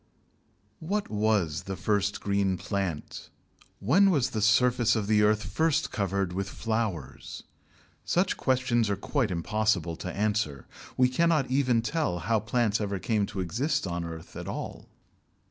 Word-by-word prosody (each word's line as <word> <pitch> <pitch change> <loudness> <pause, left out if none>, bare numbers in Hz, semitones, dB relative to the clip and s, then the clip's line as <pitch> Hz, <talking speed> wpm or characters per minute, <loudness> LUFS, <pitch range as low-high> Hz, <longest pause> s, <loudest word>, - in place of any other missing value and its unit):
What 200 +6 -2
was 105 -7 0
the 95 - -4
first 100 0 0
green 100 -2 +1
plant? 95 -4 -4 0.5
When 180 - +4
was 145 -9 +1
the 110 - -2
surface 120 +2 +4
of 110 -2 -1
the 105 0 +3
earth 105 0 +3
first 160 -2 0
covered 100 -2 -1
with 95 +1 -3
flowers? 105 - -4 0.6
Such 185 +2 +1
questions 125 -4 +1
are 100 - +1
quite 125 +5 -1
impossible 90 -1 0
to 90 - -5
answer. 100 - -1 0.3
We 125 - +5
cannot 150 0 +1
even 130 -4 +2
tell 145 - -1
how 110 +6 +1
plants 110 0 0
ever 100 -1 -2
came 105 +1 0
to 100 -2 -4
exist 135 - -1
on 85 -1 -3
the 85 - -4
earth 80 -1 -10
at - - -6
all. - - -6
110 Hz, 150 wpm, -28 LUFS, 95-125 Hz, 0.6 s, We